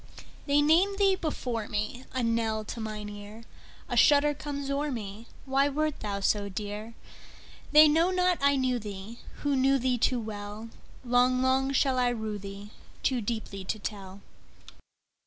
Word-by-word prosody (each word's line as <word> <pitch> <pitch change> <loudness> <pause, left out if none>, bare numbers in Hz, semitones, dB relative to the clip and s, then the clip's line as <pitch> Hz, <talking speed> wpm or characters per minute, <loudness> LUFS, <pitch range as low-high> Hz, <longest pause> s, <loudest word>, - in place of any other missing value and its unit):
They 290 +1 +4
name 350 +7 +4
thee 395 -1 +4
before 250 - -3
me,A 245 +4 -3
knell 225 -2 0
to 230 - -6
mine 215 -1 -5
ear;A 210 +2 -10
shudder 295 0 +5
comes 285 -1 -5
o'er 290 +2 -1
me—Why 240 +5 -2
wert 305 +1 -1
thou 200 -1 -3
so 200 0 +1
dear? 210 +3 -6 0.8
They 305 +1 +9
know 325 +4 +3
not 365 -1 +2
I 280 0 +4
knew 255 -2 +1
theeWho 210 +2 -8 0.4
knew 270 +1 +3
thee 250 -1 0
too 250 +2 +2
well:Long, 230 +4 -2
long 265 +1 +2
shall 265 -1 +2
I 245 -1 +3
rue 220 -3 -3
theeToo 205 +5 -5
deeply 205 -3 -4
to 215 - -2
tell. 200 -2 -7
240 Hz, 140 wpm, -28 LUFS, 210-280 Hz, 0.8 s, They